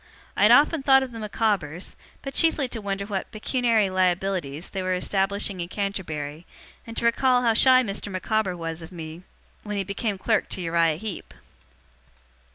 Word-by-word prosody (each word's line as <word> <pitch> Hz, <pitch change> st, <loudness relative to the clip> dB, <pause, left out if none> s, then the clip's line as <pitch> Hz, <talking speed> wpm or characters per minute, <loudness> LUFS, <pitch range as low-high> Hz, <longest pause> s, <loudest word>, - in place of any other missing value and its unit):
I -, -, -2 dB
had -, -, +7 dB
often 300 Hz, +1 st, +5 dB
thought 270 Hz, -1 st, +5 dB
of 260 Hz, -, -6 dB
the 230 Hz, -, -8 dB
Micawbers, 205 Hz, -6 st, -2 dB, 0.3 s
but 275 Hz, -, -5 dB
chiefly 320 Hz, -5 st, +2 dB
to 225 Hz, -, -5 dB
wonder 200 Hz, -1 st, -3 dB
what 200 Hz, -2 st, -4 dB
'pecuniary 225 Hz, -1 st, +1 dB
liabilities' 180 Hz, -4 st, -1 dB
they 190 Hz, -, -3 dB
were 185 Hz, 0 st, 0 dB
establishing 195 Hz, +1 st, -1 dB
in 170 Hz, -, -3 dB
Canterbury, 170 Hz, -6 st, -4 dB, 0.4 s
and 230 Hz, -, -8 dB
to -, -, -1 dB
recall 250 Hz, +1 st, +3 dB
how 230 Hz, -2 st, +3 dB
shy 255 Hz, +3 st, +6 dB
Mr. 205 Hz, -1 st, -4 dB
Micawber 190 Hz, 0 st, -1 dB
was 165 Hz, 0 st, -5 dB
of 165 Hz, -, -10 dB
me 165 Hz, -1 st, -8 dB, 0.4 s
when 210 Hz, -1 st, -5 dB
he 195 Hz, -, 0 dB
became 200 Hz, +2 st, -3 dB
clerk 220 Hz, +3 st, 0 dB
to -, -, -5 dB
Uriah 165 Hz, -2 st, +2 dB
Heep. 210 Hz, 0 st, -7 dB
200 Hz, 170 wpm, -25 LUFS, 175-225 Hz, 0.4 s, had